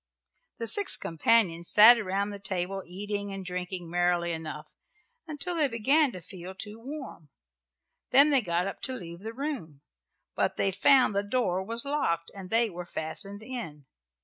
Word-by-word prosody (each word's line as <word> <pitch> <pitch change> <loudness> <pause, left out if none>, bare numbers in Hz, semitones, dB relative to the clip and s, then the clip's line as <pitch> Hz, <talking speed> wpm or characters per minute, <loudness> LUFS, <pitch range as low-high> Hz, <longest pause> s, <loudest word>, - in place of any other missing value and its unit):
The 230 - -4
six 405 - +4
companions 170 +1 +1
sat 230 +3 +8
around 200 0 -1
the 200 - -7
table 195 0 -3
eating 205 +2 -4
and 195 -1 -6
drinking 180 0 -5
merrily 175 0 +1
enough, 155 -2 -6 0.6
until 315 +4 -4
they 310 -4 +2
began 270 +5 +2
to 185 - -8
feel 185 +1 -10
too 210 +3 -7
warm. 265 - -9 0.8
Then 280 +3 +6
they 275 -3 +4
got 175 -3 -1
up 195 - -6
to 260 - -1
leave 170 -8 -7
the 220 +3 -6
room, 230 - -5 0.5
but - - -1
they 195 - +1
found 250 +2 +4
the 200 - +2
door 205 -4 0
was 230 +6 -3
locked 170 - -1
and 190 -2 -9
they 230 +2 +3
were 175 -3 -8
fastened 195 +7 -3
in. 220 - -7
200 Hz, 165 wpm, -28 LUFS, 175-235 Hz, 0.8 s, sat